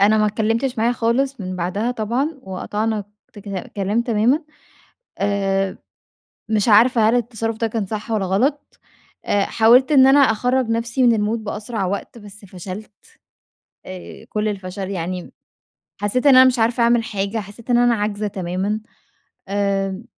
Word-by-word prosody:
أنا 210 +2 +5
ما 215 - +3
اتكلّمتش 225 +4 -1
معاه 230 +2 +2
خالص 245 +3 0
من 185 -1 -5
بعدها 190 +7 -1
طبعًا، 250 +7 -2
وقطعنا 210 +3 -3 0.3
تكك 200 -3 -7
كلام 205 +4 0
تمامًا. 240 +7 +1 0.7
آآ 195 -1 0 0.7
مش 215 0 +1
عارفة 225 +1 +5
هل 230 - +3
التصرُّف 225 -2 -2
ده 230 - -1
كان 220 -2 -3
صح 215 +2 -6
والّا 210 -4 0
غلط؟ 265 +11 -1 0.4
أ 200 -1 +1
حاولت 245 +7 +4
إن 265 -2 +7
أنا 275 +2 +6
أخرّج 250 0 +2
نفسي 230 +3 -1
من 240 -2 +5
المود 220 +1 -1
بأسرع 210 0 -4
وقت، 200 +5 -5
بس 205 -1 -12
فشلت. 190 +3 -9 0.9
آآ 185 -1 -10
كل 215 0 -1
الفَشَل 190 -1 -5
يعني 180 0 -3
م - - -15 0.7
حسّيت 250 +7 0
إن 275 -2 +7
أنا 260 - +9
مش 255 -1 +3
عارفة 235 +2 +2
أعمل 235 0 +3
حاجة، 200 +1 -3
حسّيت 215 +4 -9
إن 240 - +4
أنا 240 0 +4
عاجزة 210 -1 -2
تمامًا. 190 +2 -2 0.7
آمم، 195 0 -1
215 Hz, 155 wpm, -20 LUFS, 200-235 Hz, 0.9 s, أنا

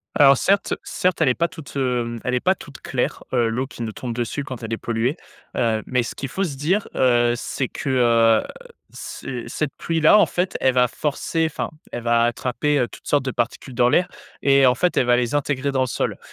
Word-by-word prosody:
Alors 140 -1 +7
certes 195 +8 +1
certes, 180 -2 -1
elle 150 - +4
est - - +3
pas 170 +6 0
toute, 140 -6 -10
heu, 120 -3 -1
elle 125 - 0
est 125 - +1
pas 185 - +3
toute 145 -7 -13
claire, 125 -2 -2
heu, 120 -2 +2
l'eau 120 +4 -1
qui 125 - -11
nous 110 -2 -4
tombe 120 -2 -5
dessus 120 +4 -3
quand 130 -4 -7
elle 115 0 -4
est - - -1
polluée, 120 +6 -1 0.4
heu, 110 -2 +1
mais 125 -1 0
ce - - -6
qu'il 135 - -4
faut 190 +9 -2
se 145 -7 -3
dire, 180 +9 +1
heu, 120 -2 +3
c'est 130 +1 -3
que, - - -5
heu, 115 -3 +4 0.5
ce 125 -3 -6
cette 140 +4 -2
pluie 165 -1 -1
là, 160 +7 +7
en - - +6
fait, 180 +1 -2
elle 130 - +3
va 125 -1 +3
forcer, 150 +6 -1
enfin, - - -4 0.2
elle 120 - -4
va 115 0 +3
attraper, 125 +5 0
heu, 125 - 0
toutes - - -13
sortes 145 -2 +2
de 130 - -2
particules 120 +2 -3
dans 120 0 +3
l'air 180 +8 +2 0.3
et 140 -1 +5
en 125 - +5
fait 180 +4 0
elle - - +4
va 120 0 +4
les 120 0 0
intégrer 140 -1 0
dans 130 -1 0
le 130 - +1
sol, - - -2
130 Hz, 235 wpm, -22 LUFS, 120-145 Hz, 0.5 s, Alors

